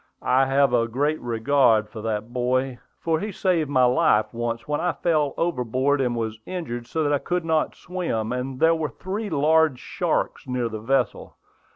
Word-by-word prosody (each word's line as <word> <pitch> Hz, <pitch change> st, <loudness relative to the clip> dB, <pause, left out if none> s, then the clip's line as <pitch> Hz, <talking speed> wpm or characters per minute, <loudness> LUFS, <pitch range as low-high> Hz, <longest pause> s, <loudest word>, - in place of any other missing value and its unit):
"I 130 Hz, +1 st, +3 dB
have 135 Hz, -1 st, +3 dB
a 115 Hz, -1 st, +3 dB
great 145 Hz, +6 st, -1 dB
regard 115 Hz, -2 st, +2 dB
for 110 Hz, 0 st, -9 dB
that 110 Hz, +1 st, -3 dB
boy, 130 Hz, +1 st, 0 dB, 0.2 s
for 160 Hz, -1 st, 0 dB
he 210 Hz, +4 st, -4 dB
saved 175 Hz, -6 st, 0 dB
my 130 Hz, -3 st, +3 dB
life 120 Hz, -3 st, +3 dB
once 115 Hz, +1 st, -3 dB
when 150 Hz, 0 st, -1 dB
I 175 Hz, -1 st, 0 dB
fell 155 Hz, -4 st, 0 dB
overboard 135 Hz, -3 st, 0 dB
and 125 Hz, -2 st, 0 dB
was 110 Hz, -1 st, -3 dB
injured 120 Hz, -10 st, -5 dB
so 160 Hz, +4 st, -1 dB
that 145 Hz, -1 st, +1 dB
I 145 Hz, -, +2 dB
could 180 Hz, +2 st, -2 dB
not 160 Hz, -1 st, 0 dB
swim, 165 Hz, -12 st, -3 dB
and 130 Hz, +1 st, -4 dB
there 165 Hz, 0 st, +5 dB
were 160 Hz, -2 st, -2 dB
three 205 Hz, +3 st, -5 dB
large 155 Hz, -2 st, +3 dB
sharks 125 Hz, -, -2 dB
near 125 Hz, -2 st, -1 dB
the 110 Hz, -1 st, -5 dB
vessel. 130 Hz, +2 st, -1 dB
135 Hz, 185 wpm, -24 LUFS, 120-160 Hz, 0.2 s, there